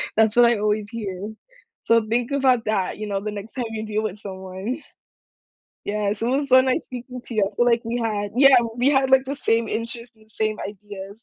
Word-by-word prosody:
That's 220 0 +3
what 240 0 +7
I 235 -3 +3
always 210 0 0
hear. 205 -2 -5 0.5
So 230 -1 +4
think 235 +3 0
about 260 -4 +2
that, 210 -2 -1
you 215 - -4
know, 200 -1 -1
the 210 +1 -4
next 205 +2 -8
time 250 -3 -3
you 220 -1 -4
deal 215 0 -2
with 210 -1 -4
someone. 190 +7 -6 1.0
Yes, 210 0 -1
it 230 - 0
was 275 +3 0
so 260 0 +7
nice 260 +4 0
speaking 250 0 -8
to 235 - -7
you, 210 - +3
I 200 - -7
feel 240 - +3
like 235 -1 +3
we 235 +1 -2
had 205 -2 -2
yeah, 275 0 +7 0.2
we 250 +3 +3
had, 270 -1 +3
like, 265 0 +5
the 275 +2 -4
same 230 -4 +1
interests 235 +1 -5
and 220 0 -23
same 215 -1 -1
ideas. 205 +1 -10
220 Hz, 220 wpm, -23 LUFS, 210-245 Hz, 1.0 s, what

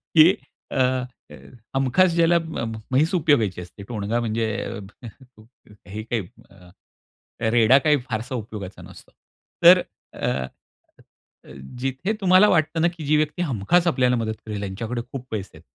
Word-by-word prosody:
की 165 +4 +7 0.4
अ, 135 - +1 0.9
हमखास 135 +7 +3
ज्याला 170 0 +4 0.5
म्हैस 150 +7 +2
उपयोगायची 125 - +2
असते. 90 +3 -11
टोणगा 110 0 -2
म्हणजे 115 -1 -1 1.4
हे 105 +2 -6
काही 115 0 -2 0.3
अ, 90 -2 -18 0.8
रेडा, 120 +2 +5
काही 150 +2 +3
फारसा 115 +4 -3
उपयोगाचा 105 -4 -7
नसतो. - - -14 0.5
तर 180 +2 +9 0.3
अ, - - -3 1.2
अ, 65 - -13 0.3
जिथे 135 - -2
तुम्हाला 185 +2 +6
वाटतं 160 0 +1
ना, 170 - +4
की 155 - -7
जी 150 +2 +3
व्यक्ती 155 +3 -1
हमखास 150 - +1
आपल्याला 125 -6 +2
मदत 110 -2 -2
करेल, 105 -2 -5
त्यांच्याकडे 110 +5 -4
खूप 130 -2 -6
पैसे 100 -4 -5
आहेत. - - -18
125 Hz, 135 wpm, -23 LUFS, 110-160 Hz, 1.4 s, तर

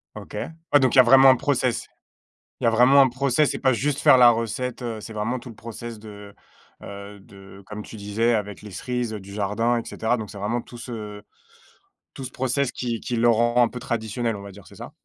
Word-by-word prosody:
OK, - - -10 0.4
ouais, 145 - +6
donc, 130 -1 +2
il - - +2
y 130 - +11
a - - +3
vraiment 135 +2 +7
un 130 - +7
process. 125 -3 -1 0.7
Il - - -5
y - - +4
a - - +5
vraiment 125 +5 +6
un 130 - +4
process, 135 +3 +1
c'est - - -3
pas 130 -3 +2
juste 140 +3 -1
faire - - +7
la 120 -1 +8
recette, 115 +3 -3
heu, 115 -2 -4
c'est 110 - -9
vraiment 110 +4 -2
tout 120 - -11
le - - -12
process 115 +1 -8
de, 105 -1 -12 0.5
heu, 100 0 -10
de 95 0 -15
comme 105 0 -7
tu 110 - -11
disais, 105 +3 0
avec 105 -1 -4
les 105 - -10
cerises 120 +4 -3
du 100 -2 -8
jardin, 110 +4 0
et - - -5
cetera, 115 +2 -1
donc 110 -3 -7
c'est 100 - -10
vraiment 115 +4 -2
tout 120 - -13
ce 105 -4 -8 0.9
tout 135 - -7
ce 125 - -8
process 130 +1 -1
qui 120 -2 -4
qui 120 - -4
le 120 +1 +3
rend 120 +1 +3
un 120 - +5
peu 125 - -9
traditionnel, 115 0 -3
on 100 - -8
va 100 - -9
dire, 100 0 -15
c'est - - -16
ça? - - -9
115 Hz, 240 wpm, -23 LUFS, 105-125 Hz, 0.9 s, y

